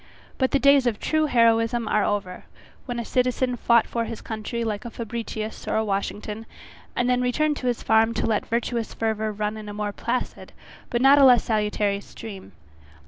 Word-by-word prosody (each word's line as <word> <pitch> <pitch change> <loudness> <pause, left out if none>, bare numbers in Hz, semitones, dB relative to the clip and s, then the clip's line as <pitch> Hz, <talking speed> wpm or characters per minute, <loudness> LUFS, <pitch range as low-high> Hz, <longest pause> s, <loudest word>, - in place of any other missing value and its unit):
But 260 -1 +2
the - - +2
days 280 -1 +5
of 220 -3 -1
true 310 -1 +1
heroism 230 -2 +2
are 210 - +2
over, 200 -3 -3 0.4
when 245 -1 -3
a 235 - -4
citizen 250 0 0
fought 235 -1 +3
for 230 -1 -2
his 230 -1 -6
country 225 +2 -4
like 215 -2 -3
a 240 - -6
Fabricius 225 -1 -6
or - - -1
a 220 - +1
Washington, 210 +2 -3 0.5
and 245 - +1
then 250 0 +2
returned 295 +4 +1
to 255 - -4
his 240 -2 -1
farm 225 +1 +3
to - - 0
let 220 -2 +1
his - - -25
virtuous 235 -1 -2
fervour 220 -1 -1
run 210 +1 -3
in 210 -1 -8
a 205 - -7
more 210 -1 -2
placid, 235 +5 -4 0.4
but 240 +1 0
not 275 +2 +7
a - - +7
less 250 -3 +7
salutary 210 -2 0
stream. 195 - -10
230 Hz, 195 wpm, -24 LUFS, 215-245 Hz, 0.5 s, not